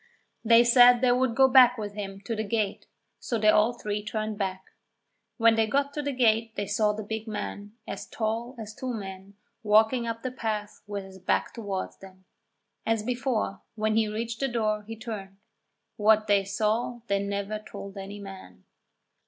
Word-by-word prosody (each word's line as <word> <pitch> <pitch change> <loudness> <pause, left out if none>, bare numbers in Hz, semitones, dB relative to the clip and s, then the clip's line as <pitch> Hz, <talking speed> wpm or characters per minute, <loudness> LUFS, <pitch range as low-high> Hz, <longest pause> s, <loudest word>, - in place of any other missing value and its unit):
They 230 +1 +7
said 245 0 +7
they 250 -1 +4
would 250 -1 +1
go 265 +1 +6
back 250 -1 +7
with 205 -2 -5
him 195 -1 -6
to 225 +3 -4
the 220 - -2
gate, 215 -2 -2 0.3
so 235 - -2
they 215 -1 +4
all 215 +2 +5
three 210 -3 -4
turned 215 0 -3
back. 190 -2 -3 0.7
When 230 -1 +5
they 225 -1 +2
got 280 +4 0
to 295 - -2
the 285 0 -2
gate 225 -3 +2
they 205 - -2
saw 210 +1 +1
the 215 +1 -5
big 220 +2 -5
man, 205 -1 -5
as - - -6
tall 230 +3 -3
as 215 -2 -7
two 255 +1 -4
men, 195 -1 -8 0.3
walking 220 +3 +3
up 230 0 -4
the 255 - -2
path 215 -4 -4
with 205 -1 -4
his 190 0 -12
back 185 - 0
towards 200 -5 -4
them. 190 -1 -15 0.6
As 225 -1 0
before, 240 -4 -2
when 215 0 0
he 220 -1 +3
reached 225 +2 -4
the 275 - +1
door, 215 -3 0
he 225 - -6
turned 210 -4 -7 0.6
what 215 0 +4
they 200 -2 +3
saw 220 +4 -1
they 200 -2 +1
never 200 +1 -3
told 200 -2 -9
any 200 +1 -7
man! 190 - -11
215 Hz, 185 wpm, -27 LUFS, 205-230 Hz, 0.7 s, They